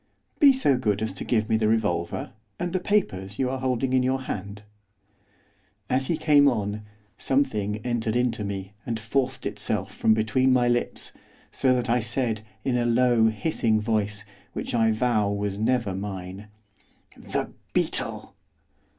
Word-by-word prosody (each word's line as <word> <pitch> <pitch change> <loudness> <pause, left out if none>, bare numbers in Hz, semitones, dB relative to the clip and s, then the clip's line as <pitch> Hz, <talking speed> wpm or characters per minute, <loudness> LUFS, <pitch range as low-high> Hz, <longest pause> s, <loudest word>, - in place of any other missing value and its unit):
'Be 285 -2 +8
so 255 - +2
good 105 -3 0
as 110 - -2
to 95 - -6
give 110 -3 +1
me 110 - +2
the 110 -1 +1
revolver, 105 -6 0 0.3
and 175 0 -2
the 185 - +1
papers 100 - -1
you 130 -1 0
are 135 - -3
holding 130 0 0
in 130 - +4
your 130 +1 0
hand.' 100 -2 -6 1.3
As 130 +1 +2
he 165 - 0
came 150 -2 +5
on, 105 -4 0 0.4
something 110 -7 0
entered 115 -2 -1
into 120 -3 0
me, 100 0 -5
and 115 -2 -3
forced 130 +4 -1
itself - - -2
from 110 - +3
between 110 +5 +2
my 125 -1 +4
lips, 120 0 -1 0.4
so 130 -1 +2
that 125 0 -1
I 120 +1 +3
said, 120 -1 -1 0.2
in 130 -2 +1
a 120 - +1
low, 120 -1 +4
hissing 110 0 +1
voice, 105 -1 -1 0.3
which - - -4
I 115 -2 +3
vow 110 -2 +1
was 100 -1 -2
never 115 -3 +1
mine, 95 +1 -6 0.7
'THE - - -4 0.2
BEETLE! - - -1
115 Hz, 160 wpm, -25 LUFS, 105-130 Hz, 1.3 s, Be